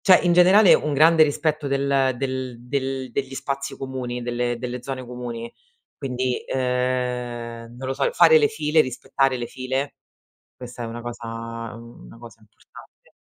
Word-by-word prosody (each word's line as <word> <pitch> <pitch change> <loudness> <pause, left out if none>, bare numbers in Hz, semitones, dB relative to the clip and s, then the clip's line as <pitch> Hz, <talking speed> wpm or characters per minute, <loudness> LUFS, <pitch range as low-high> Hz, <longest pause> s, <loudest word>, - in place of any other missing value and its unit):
cioè, 185 -2 +7
in 175 - +4
generale 185 +3 +7
un 150 - 0
grande 160 +3 +6
rispetto 155 0 0
del 135 -1 +1
del 130 -1 -3
del 135 0 -3
degli 135 -1 -3
spazi 140 +1 -4
comuni, 130 -2 -5
delle 120 0 -1
delle 125 0 -5
zone 130 0 -5
comuni. 120 -1 -6 0.4
Quindi, 130 -2 -2
ehm 125 -2 -2
non 130 +1 -6
lo 135 - 0
so, 140 0 +1
fare 160 -2 +7
le 145 -1 +3
file, 150 +1 +2
rispettare 135 0 0
le 120 -1 -4
file, 130 +3 -3 0.6
questa 125 -1 -9
è 115 - -3
una 115 +1 -6
cosa 120 0 -7 0.5
una 115 0 -13
cosa 115 -2 -13
importante. 105 - -19
130 Hz, 155 wpm, -23 LUFS, 120-140 Hz, 0.6 s, cioè